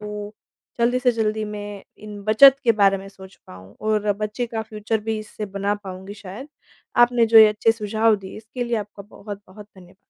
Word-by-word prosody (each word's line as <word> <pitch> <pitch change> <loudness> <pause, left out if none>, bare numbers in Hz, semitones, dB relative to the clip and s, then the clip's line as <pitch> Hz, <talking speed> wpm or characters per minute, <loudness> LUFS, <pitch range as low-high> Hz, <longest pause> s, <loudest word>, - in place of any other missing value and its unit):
तो 210 0 -7 0.4
जल्दी 240 +2 +2
से 250 -1 +3
जल्दी 215 -1 -1
मैं 205 -1 -7 0.2
इन 210 -1 -10
बचत 265 +6 +7
के 230 - +5
बारे 200 -2 +3
में 195 +1 -10
सोच 190 -1 -14
पाऊँ 95 +2 -14 0.2
और 210 -1 +1
बच्चे 215 +3 -3
का 225 -1 -4
फ्यूचर 220 +1 -3
भी 220 -1 0
इससे 215 0 -7
बना 200 +1 -2
पाऊँगी 190 -1 -9
शायद। 205 +7 -10 0.5
आपने 240 -1 +4
जो 225 0 +7
ये 220 - +10
अच्छे 210 +1 +2
सुझाव 220 0 +1
दिए, 190 -1 -10
इसके 225 +3 -6
लिए 240 -1 -1
आपका 205 -1 -7
बहुत-बहुत 205 0 -11
धन्यवाद। 185 0 -17
210 Hz, 190 wpm, -22 LUFS, 200-225 Hz, 0.5 s, ये